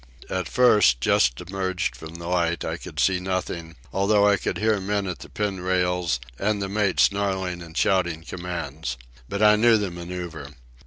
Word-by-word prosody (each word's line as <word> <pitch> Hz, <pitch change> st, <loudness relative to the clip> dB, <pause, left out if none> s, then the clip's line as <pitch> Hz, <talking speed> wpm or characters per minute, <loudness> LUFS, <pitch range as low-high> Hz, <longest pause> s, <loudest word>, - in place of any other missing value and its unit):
At 95 Hz, 0 st, -1 dB
first, 110 Hz, -, +5 dB
just -, -, +2 dB
emerged 95 Hz, -5 st, -2 dB
from 80 Hz, +6 st, -10 dB
the 85 Hz, 0 st, -8 dB
light, 85 Hz, -3 st, 0 dB
I -, -, -2 dB
could -, -, -8 dB
see 95 Hz, -1 st, +3 dB
nothing, 90 Hz, -3 st, -3 dB, 0.2 s
although 100 Hz, +1 st, +3 dB
I 100 Hz, -, +5 dB
could -, -, -3 dB
hear 110 Hz, -1 st, +2 dB
men 100 Hz, +1 st, -1 dB
at 90 Hz, -7 st, -4 dB
the -, -, -11 dB
pin 100 Hz, -2 st, -2 dB
rails 90 Hz, -5 st, 0 dB, 0.2 s
and 105 Hz, +1 st, 0 dB
the 100 Hz, -, -2 dB
mate 100 Hz, -1 st, 0 dB
snarling 95 Hz, -3 st, +1 dB
and 85 Hz, -1 st, -10 dB
shouting 85 Hz, -4 st, +1 dB
commands. 80 Hz, -7 st, -5 dB, 0.3 s
But 100 Hz, +2 st, -1 dB
I 105 Hz, 0 st, +7 dB
knew 115 Hz, +1 st, +5 dB
the 100 Hz, -3 st, -2 dB
manoeuvre. 85 Hz, -4 st, -7 dB
90 Hz, 175 wpm, -24 LUFS, 85-100 Hz, 0.3 s, I